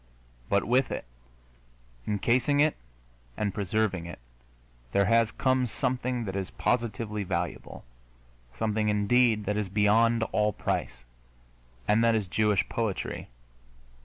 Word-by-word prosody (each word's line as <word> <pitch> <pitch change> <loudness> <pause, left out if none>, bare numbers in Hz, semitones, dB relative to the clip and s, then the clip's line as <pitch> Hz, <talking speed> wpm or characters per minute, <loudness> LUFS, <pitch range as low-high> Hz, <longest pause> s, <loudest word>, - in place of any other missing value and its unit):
But 100 0 +2
with 125 +2 +2
it, - - -4 1.0
encasing 120 +7 +2
it 150 +1 +3 0.6
and 100 -2 -1
preserving 100 -3 -1
it, 85 - -8 0.8
there 100 - +3
has 115 +1 +3
come 130 +1 +1
something 125 +1 -2
that 95 -1 -4
is 95 -1 -3
positively 110 -3 -1
valuable 85 -2 -4 0.7
something, 110 -1 0
indeed, 105 +1 +3
that 105 +1 -1
is 105 -3 -2
beyond 110 +3 +3
all 105 0 +1
price 60 - -3 0.8
and 105 +2 +3
that 115 -1 +4
is 110 -2 0
Jewish 105 0 +1
poetry. 110 -5 -3
105 Hz, 120 wpm, -28 LUFS, 100-115 Hz, 1.0 s, that